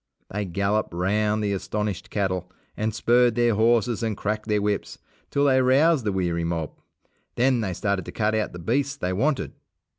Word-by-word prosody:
They 105 +1 -2
galloped 100 +1 -1
round 105 +4 +1
the 100 -1 0
astonished 105 -1 -3
cattle 95 -3 -2 0.2
and 110 +1 -1
spurred 120 +1 +3
their 120 -1 +3
horses 115 +1 +2
and 110 -3 -2
cracked 110 +1 -3
their 105 -1 +2
whips, 105 0 -2 0.3
till 140 0 +1
they 130 -2 +4
roused 135 +2 +3
the 105 - +1
weary 85 -3 -1
mob. 85 -2 -2 0.6
Then 125 -1 +2
they 95 -4 -2
started 100 -2 -1
to - - -7
cut 110 0 0
out 110 -1 0
the - - -8
beasts 135 +10 -1
they 90 -7 -2
wanted. 140 +9 0
105 Hz, 180 wpm, -24 LUFS, 95-120 Hz, 0.6 s, they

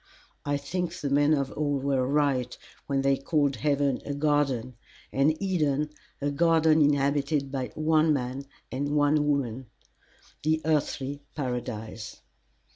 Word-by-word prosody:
I 145 0 +1
think 170 +4 -3
the 140 -4 -4
men 145 +2 +4
of 140 -2 -2
old 145 -2 -1
were 135 -2 +1
right 140 -3 +1 0.3
when 135 -1 0
they 135 0 +3
called 140 -2 +1
heaven 140 +1 +1
a 145 - -4
garden, 140 -5 +1 0.4
and 150 +4 +2
Eden 150 -6 0 0.3
a 145 0 -1
garden 160 0 +4
inhabited 140 0 +1
by 130 -2 -3
one 155 0 +3
man 135 -1 -2 0.3
and 140 +2 -2
one 145 0 +3
woman, 130 -4 -1 0.7
the 155 +1 +1
Earthly 145 -2 -1
Paradise. 120 -5 -5
145 Hz, 130 wpm, -27 LUFS, 135-150 Hz, 0.7 s, men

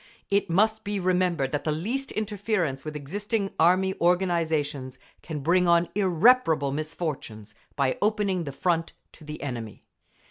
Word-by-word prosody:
It 200 -1 +2
must 220 +5 +2
be 205 0 -2
remembered 180 -6 +1
that 145 -1 -2
the 155 - 0
least 230 - -2
interference 200 -9 -2
with 155 -1 -6
existing 200 - -3
Army 185 +3 +4
organisations 160 -7 0 0.2
can 155 -4 -5
bring 175 +5 +3
on 170 0 +4
irreparable 185 - +3
misfortunes, 145 - -5 0.2
by 135 -2 0
opening 205 -4 +1
the 140 - -4
Front 165 +4 -1 0.2
to - - -16
the 150 0 -7
enemy. 120 -6 -6
170 Hz, 140 wpm, -26 LUFS, 150-195 Hz, 0.2 s, Army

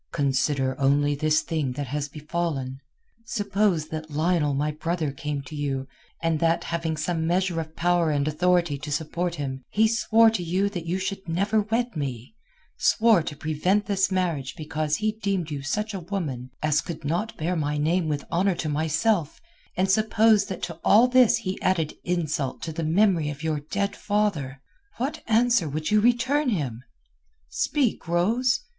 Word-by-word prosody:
Consider 135 -1 +1
only 145 +1 +3
this 155 +2 +2
thing 150 -6 -2
that 145 +2 -4
has 145 +2 -3
befallen. 150 -3 -3 0.4
Suppose 205 -6 0
that 155 0 -5
Lionel 155 -1 +1
my 150 +2 0
brother 160 0 -2
came 145 0 -4
to 135 +3 -9
you, 135 -2 -2 0.4
and 165 -2 +1
that, 165 +1 +2
having 165 -1 -2
some 160 +1 -1
measure 180 0 +1
of 160 0 -10
power 175 -1 +2
and 145 -1 0
authority 170 -1 +1
to 150 +1 -6
support 170 +4 -2
him, 135 -3 -4
he 220 +1 +3
swore 225 0 +4
to 220 - -2
you 185 +4 0
that 175 -4 -6
you 180 +3 0
should 190 -1 -4
never 200 +6 +1
wed 230 +2 -1
me, 130 - -4 0.4
swore 225 -5 +4
to 155 - -5
prevent 170 +7 0
this 195 -2 +1
marriage 170 -8 -1
because 155 -2 -2
he 215 +3 0
deemed 195 -6 -2
you 145 -2 -3
such 210 +10 -2
a 195 - -3
woman 160 -9 -4
as 155 0 +2
could 165 -4 -7
not 175 +9 -2
bear 170 +3 -1
my 150 -2 -1
name 160 +3 +1
with 145 -2 -2
honour 185 +2 +2
to 160 - -3
myself; 160 +3 0 0.4
and 190 +1 +2
suppose 215 0 +4
that 190 - -6
to 170 -1 -5
all 225 +5 +6
this 250 -2 +5
he 185 0 -4
added 170 -5 +1
insult 155 -6 -2
to 165 - -3
the 165 +1 -3
memory 170 -1 +2
of 150 +1 -7
your 155 -2 0
dead 200 +7 -2
father, 180 -11 -1 0.3
what 265 +5 -3
answer 230 -6 +3
would 155 +6 -3
you 210 0 +5
return 250 +5 +2
him? 135 - -2 0.7
Speak, 270 - 0
Rose! 225 +10 +2
165 Hz, 175 wpm, -25 LUFS, 150-200 Hz, 0.7 s, all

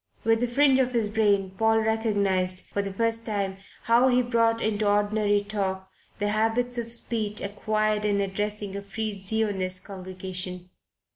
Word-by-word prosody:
With 225 0 +3
the 245 - +1
fringe 265 +2 +4
of 255 -1 +1
his 225 -3 +1
brain 205 -3 +2
Paul 220 0 +4
recognized, 200 -5 0
for 200 - -2
the 200 -1 -4
first 230 +3 +1
time, 200 -3 -2 0.3
how 235 +3 +4
he 250 -1 +3
brought 230 -1 +2
into 210 -2 0
ordinary 205 0 +2
talk 190 -2 -3 0.3
the 205 -1 0
habits 225 +3 +1
of 230 0 -5
speech 220 -3 -2
acquired 215 +1 -1
in 205 -1 +1
addressing 205 0 -3
a 200 - -4
Free 215 +2 -4
Zionist 195 -2 -1
congregation. 185 -1 -6
210 Hz, 155 wpm, -26 LUFS, 195-225 Hz, 0.3 s, fringe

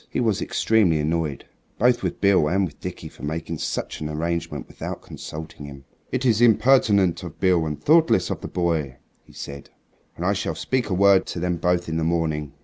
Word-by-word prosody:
He - - -2
was 110 -4 +1
extremely 105 -8 +2
annoyed 75 -1 -2 0.3
both 120 +1 +3
with - - -3
Beale 100 -6 +4
and 95 +4 +2
with 75 - -10
Dickie - - -7
for - - -15
making 80 +1 -4
such - - -4
an 75 - -3
arrangement 85 +2 -3
without - - -7
consulting 75 -1 -8
him. 70 -2 -11 0.3
"It 130 +1 -1
is 115 -2 +3
impertinent 110 -5 +4
of 85 -4 -9
Beale 90 -4 +2
and 75 -2 -4
thoughtless 155 - +3
of - - -4
the - - -5
boy," 80 -7 -1 0.3
he - - -20
said; 70 0 -8 0.5
"and 85 - -5
I 100 - +3
shall 100 - -2
speak 130 -4 -1
a 95 - 0
word 100 0 +5
to - - -4
them 90 0 -1
both 90 +1 0
in 80 0 -2
the 80 - 0
morning." 80 -3 -1
85 Hz, 200 wpm, -23 LUFS, 80-100 Hz, 0.5 s, word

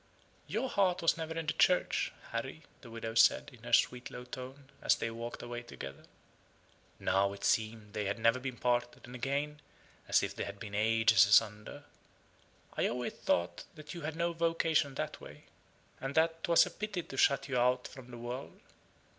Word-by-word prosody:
"Your 220 - -1
heart 190 -7 +1
was 165 - +4
never 160 0 -5
in 165 - -2
the 155 - 0
Church, 180 +3 +2 0.2
Harry," - - -4 0.2
the - - -12
widow 115 0 -5
said, 115 - +4
in - - -16
her - - -8
sweet 125 0 +3
low 125 - -8
tone, 130 +2 -9
as - - +4
they 115 - -3
walked 115 +1 -6
away 120 0 -5
together. 70 - -9 0.9
(Now, 100 +1 +2
it 100 - -11
seemed 110 -2 0
they 105 -2 -1
never 115 +3 +2
had - - -9
been 130 -2 -4
parted, 120 0 -1
and 120 - -11
again, 140 +4 -2 0.5
as - - +4
if - - -2
they - - -3
had 100 0 -8
been 105 -3 -8
ages 110 -1 +5
asunder.) 105 0 +2 0.9
"I - - +2
always 125 0 -3
thought 85 0 -1 0.2
you 170 - -6
had 155 +1 -4
no 170 +1 0
vocation 165 -4 +1
that - - -4
way; - - -12 0.6
and 135 +2 -4
that 165 0 +2
'twas 170 -1 +6
a - - -7
pity 210 -4 -4
to 135 - -10
shut 140 +1 +3
you 130 -3 0
out 125 +1 +2
from 130 -2 -12
the 120 - -9
world. 120 +3 -6
125 Hz, 185 wpm, -32 LUFS, 115-155 Hz, 0.9 s, twas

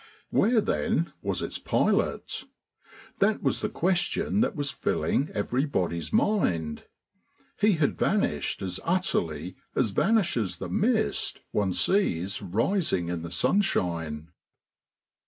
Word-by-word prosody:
Where, 230 -1 +4
then, 210 -4 0
was - - -1
its - - -4
pilot? - - 0 0.7
That 210 +2 +2
was - - +1
the 215 - -1
question 185 +3 +1
that 230 - +1
was 145 -2 -1
filling 140 - 0
everybody's 105 - -1
mind. 90 - +1 0.7
He 210 +1 +4
had 155 -4 0
vanished 85 - 0
as 90 -1 -3
utterly 90 - -1 0.2
as 120 -6 +2
vanishes 170 - +1
the - - -6
mist 220 +1 0
one 100 -3 +1
sees 100 - +1
rising 105 - 0
in 85 -1 -3
the 85 - -6
sunshine. 85 - 0
130 Hz, 115 wpm, -27 LUFS, -, 0.7 s, Where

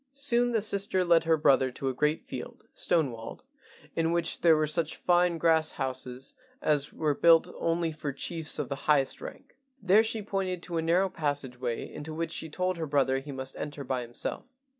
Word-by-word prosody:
Soon 245 -4 +1
the 225 -2 +1
sister 200 -3 +1
led 170 -1 +4
her 160 -1 +3
brother 135 -3 +4
to 135 +2 -5
a 130 - 0
great 150 +4 +1
field, - - -8
stone 160 -6 +1
walled, 115 -1 -9 0.5
in 165 0 +1
which 170 -1 0
were 160 -2 +5
such 155 +1 0
fine 175 -1 +2
grass 160 -1 +3
houses 130 -1 -4 0.3
as 145 -2 +1
were 155 -2 0
built 165 +2 +4
only 165 0 0
for 155 -2 -4
chiefs 160 +4 -3
of - - -2
the - - -3 0.2
highest 140 -3 +3
rank. - - -10 0.2
There 200 +1 +5
she 225 -1 -2
pointed 190 -3 -2
to 170 - -3
a - - +1
narrow 175 +4 +3
passage 145 -6 -3
way 120 -2 -3
into 155 +1 -7
which 165 0 -3
she 160 - -4
told 180 +3 -1
her 160 -1 -3
brother 135 -2 +2
he 140 +2 -8
must 130 0 -6
enter 145 -1 -5
by 130 -1 -2
himself. 120 - -5
160 Hz, 195 wpm, -29 LUFS, 140-175 Hz, 0.5 s, were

